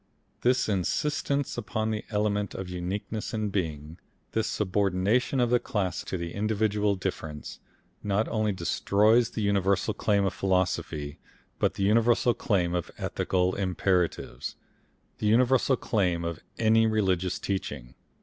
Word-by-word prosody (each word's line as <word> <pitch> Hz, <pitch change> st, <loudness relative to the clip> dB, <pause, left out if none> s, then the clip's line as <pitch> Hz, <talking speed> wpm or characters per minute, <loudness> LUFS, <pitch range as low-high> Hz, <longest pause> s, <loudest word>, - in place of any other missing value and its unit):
This 125 Hz, +1 st, +2 dB
insistence 140 Hz, -, 0 dB
upon 110 Hz, 0 st, -2 dB
the 105 Hz, -1 st, -3 dB
element 105 Hz, -1 st, 0 dB
of 95 Hz, -1 st, -5 dB
uniqueness 100 Hz, +6 st, -4 dB
in 110 Hz, -1 st, -1 dB
being, 80 Hz, -3 st, -3 dB, 0.3 s
this 110 Hz, -1 st, 0 dB
subordination 100 Hz, +6 st, +1 dB
of 120 Hz, -1 st, +2 dB
the 125 Hz, -, +5 dB
class 95 Hz, -6 st, -2 dB
to 95 Hz, -, -3 dB
the 85 Hz, -1 st, -5 dB
individual 105 Hz, -1 st, +1 dB
difference, 80 Hz, -5 st, -5 dB, 0.4 s
not 105 Hz, +1 st, 0 dB
only 110 Hz, -1 st, +1 dB
destroys 105 Hz, +5 st, +3 dB
the 110 Hz, -, -3 dB
universal 100 Hz, +1 st, +1 dB
claim 100 Hz, -1 st, +1 dB
of 95 Hz, -, 0 dB
philosophy, 90 Hz, -6 st, -1 dB, 0.4 s
but -, -, +1 dB
the 100 Hz, -, -2 dB
universal 115 Hz, +4 st, +4 dB
claim 90 Hz, -7 st, 0 dB
of 90 Hz, -2 st, -2 dB
ethical 90 Hz, 0 st, 0 dB
imperatives, 90 Hz, -8 st, -1 dB, 0.6 s
the 105 Hz, -, 0 dB
universal 125 Hz, +3 st, +4 dB
claim 90 Hz, -6 st, 0 dB
of 85 Hz, 0 st, -3 dB, 0.2 s
any 115 Hz, 0 st, +4 dB
religious 95 Hz, -5 st, +1 dB
teaching. 75 Hz, -10 st, -4 dB
100 Hz, 130 wpm, -28 LUFS, 90-110 Hz, 0.6 s, the